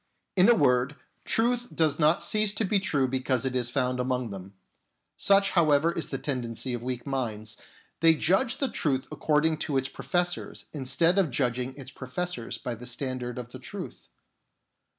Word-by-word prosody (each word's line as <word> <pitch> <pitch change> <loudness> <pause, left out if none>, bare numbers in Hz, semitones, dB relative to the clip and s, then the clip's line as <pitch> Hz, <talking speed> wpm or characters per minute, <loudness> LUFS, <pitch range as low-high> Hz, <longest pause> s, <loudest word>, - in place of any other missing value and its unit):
In 190 +3 +6
a 240 - +7
word, 130 - +2 0.3
truth 240 +1 +1
does 155 -2 +2
not 155 +3 +3
cease 215 -1 +2
to 220 - 0
be 200 +1 +2
true 145 -9 +1
because 130 -1 -1
it 130 -1 -1
is 125 -1 0
found 125 -1 0
among 125 -2 -1
them. 95 0 -9 0.6
Such, 195 0 +3
however, 160 -2 +4
is 170 - -3
the - - -2
tendency 125 -2 -3
of 120 - -3
weak 125 0 -4
minds: 110 -6 -3 0.4
they 165 -1 +6
judge 195 - +2
the 275 - 0
truth 135 -4 -1
according 155 +1 +2
to 150 -2 -1
its 135 0 -1
professors 175 +7 -2
instead 165 +6 +2
of 180 -6 +2
judging 125 0 -1
its 135 -1 -8
professors 130 0 -4
by 125 - -4
the 120 +2 -8
standard 125 -1 -4
of 125 -1 -7
the - - -9
truth. - - -8
135 Hz, 170 wpm, -27 LUFS, 125-170 Hz, 0.6 s, a